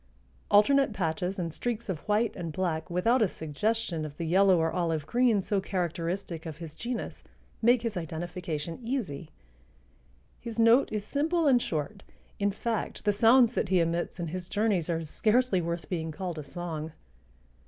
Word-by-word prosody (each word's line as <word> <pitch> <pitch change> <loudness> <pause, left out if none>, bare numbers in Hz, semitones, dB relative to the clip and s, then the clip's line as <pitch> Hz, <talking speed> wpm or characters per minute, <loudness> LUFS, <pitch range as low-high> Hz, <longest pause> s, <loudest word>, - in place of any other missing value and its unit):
Alternate 270 +4 +5
patches 180 +1 -2
and 170 -3 -3
streaks 235 +2 -3
of 185 -6 -3
white 215 +2 +1
and 170 -4 -4
black 160 0 -2
without 225 +9 +2
a 215 - +5
suggestion 170 +2 -2
of 150 -1 -7
the 170 - -3
yellow 190 +2 +5
or 160 0 +1
olive 165 -4 -1
green 235 0 +2
so 200 0 0
characteristic 175 -2 -3
of 155 -2 -7
his 160 -2 -9
genus 240 +4 -5 0.4
make 240 +1 +4
his 230 -3 -2
identification 165 0 -4
easy. 220 - -3 1.1
His 230 -1 -7
note 230 +3 +5
is 210 -1 -3
simple 320 +6 0
and 255 -4 +5
short; 165 +5 -3 0.4
in 200 0 +2
fact 220 +2 -3
the 205 - +3
sounds 235 +3 +5
that - - -1
he 185 -1 +4
emits 170 +2 -1
in 170 -2 -3
his 180 +1 -5
journeys 205 -6 +1
are 165 -1 -1
scarcely 215 +4 +2
worth 170 -2 -3
being 160 -3 -3
called 170 0 -5
a - - -5
song. 160 +1 -5
185 Hz, 165 wpm, -29 LUFS, 165-225 Hz, 1.1 s, Alternate